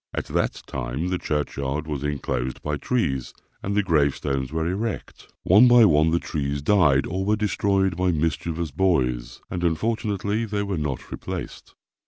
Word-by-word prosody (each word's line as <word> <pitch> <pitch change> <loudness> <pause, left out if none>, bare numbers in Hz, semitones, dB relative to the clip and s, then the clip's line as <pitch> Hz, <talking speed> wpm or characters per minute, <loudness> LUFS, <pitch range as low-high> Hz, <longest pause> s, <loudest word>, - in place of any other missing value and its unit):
At - - -2
that - - -1
time 70 +9 -3
the 90 -1 -1
churchyard 75 0 -2
was 75 -3 -4
enclosed 65 -3 -3
by 75 0 -1
trees, 70 - -1 0.3
and 100 +1 -2
the 105 - +3
gravestones 70 -5 0
were 80 0 -1
erect. 100 +4 -4
One 105 +7 +7
by 120 -2 +7
one 80 -3 +4
the 85 - +2
trees 70 -4 -3
died 75 -8 +4
or 95 +2 -2
were 105 +2 +2
destroyed 100 -3 +1
by 90 0 +1
mischievous 80 0 -1
boys, 65 -8 0
and 90 - -3
unfortunately 105 +4 0
they 105 -1 -2
were 100 -4 -2
not 75 -3 -4
replaced. - - -7
80 Hz, 160 wpm, -24 LUFS, 70-100 Hz, 0.3 s, One